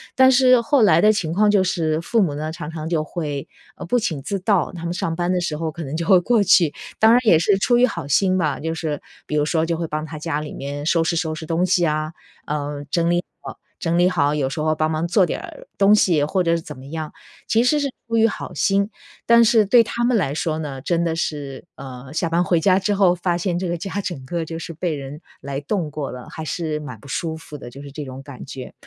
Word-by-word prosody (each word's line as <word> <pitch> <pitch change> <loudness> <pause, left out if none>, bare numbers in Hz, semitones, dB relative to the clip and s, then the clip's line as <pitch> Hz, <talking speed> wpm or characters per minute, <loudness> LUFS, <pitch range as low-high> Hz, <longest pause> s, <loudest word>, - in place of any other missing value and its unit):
但 260 0 +6
是 255 -1 +6
后 260 +2 +2
来 170 -6 +5
的 215 +3 +5
情 165 -6 -2
况 210 +2 +3
就 200 -2 +4
是 165 -4 0
父 230 +4 +1
母 155 -7 +1
呢， 155 +1 -4
常 160 -2 -7
常 160 -1 -5
就 160 -3 0
会， 145 -4 -4 0.3
呃， - - -7
不 245 - +1
请 155 -10 -2
自 200 +8 -3
到， 200 -2 +1
他 170 -1 -8
们 170 +1 -2
上 165 -2 -2
班 175 +1 -1
的 180 - +1
时 155 -3 -2
候 160 -1 -3
可 165 +1 -7
能 140 +3 -5
就 165 0 -2
会 190 -3 +6
过 225 +2 +2
去。 170 -5 +4 0.3
当 220 +1 +6
然 245 - +6
也 190 -8 +6
是 195 +4 +3
出 240 +5 +2
于 250 - +6
好 230 - -5
心 185 +6 +2
吧， 150 -5 0
就 160 +2 -3
是 155 -3 -3 0.2
比 150 - -4
如 150 0 +2
说 160 +1 +1
就 165 0 -1
会 165 -1 -3
帮 155 0 -3
他 160 0 -8
家 150 -1 -2
里 150 - -7
面 145 +1 -5
收 165 0 +2
拾 170 - 0
收 160 -2 -1
拾 160 - -7
东 165 +3 +1
西 180 -1 +2
啊， 155 +1 -1 0.3
呃， 145 -1 -3
整 170 +2 +1
理 175 0 +1 0.2
好 - - -8 0.2
整 170 -1 0
理 180 +1 +5
好。 145 -5 +1
有 135 -3 0
时 135 - -5
候 155 0 +1
帮 155 0 0
忙 160 +2 -1
做 190 +2 +3
点 - - -3
儿 - - -11
东 200 +1 +5
西 165 -8 +3
或 185 +5 0
者 165 - +1
是 165 - -2
怎 - - -9
么 130 - -12
样， 155 0 -5 0.3
其 230 +2 +3
实 295 +4 +3
是 285 - 0 0.2
出 230 - 0
于 225 0 +5
好 210 - -6
心， 200 0 +2 0.4
但 235 0 +7
是 220 -1 +5
对 235 +3 +6
他 235 +1 -3
们 245 -1 +3
来 140 -9 0
说 155 0 -1
呢， 140 -4 -5
真 170 +3 0
的 165 -1 -1
是， 145 -5 -4
呃， 130 0 -9
下 165 - 0
班 170 +2 +2
回 175 -2 +2
家 185 +2 +3
之 205 +2 0
后 190 -3 +4
发 175 -1 -1
现 175 -1 -1
这 185 - -2
个 175 - -1
家 195 +3 -4
整 150 -9 -5
个 170 +3 -3
就 165 +1 -6
是 165 - -7
被 165 -1 -2
人 140 +3 -8 0.2
来 140 0 -4
动 165 +1 -2
过 145 -1 -4
了， 125 -1 -9
还 160 - -6
是 155 -1 -3
蛮 125 -7 -8
不 140 - -15
舒 160 +4 -3
服 155 -2 -11
的， 120 - -9
就 135 +3 -11
是 140 - -10
这 150 +1 -6
种 130 0 -8
感 140 -3 -10
觉。 130 -1 -8
165 Hz, 285 characters per minute, -21 LUFS, 150-190 Hz, 0.4 s, 但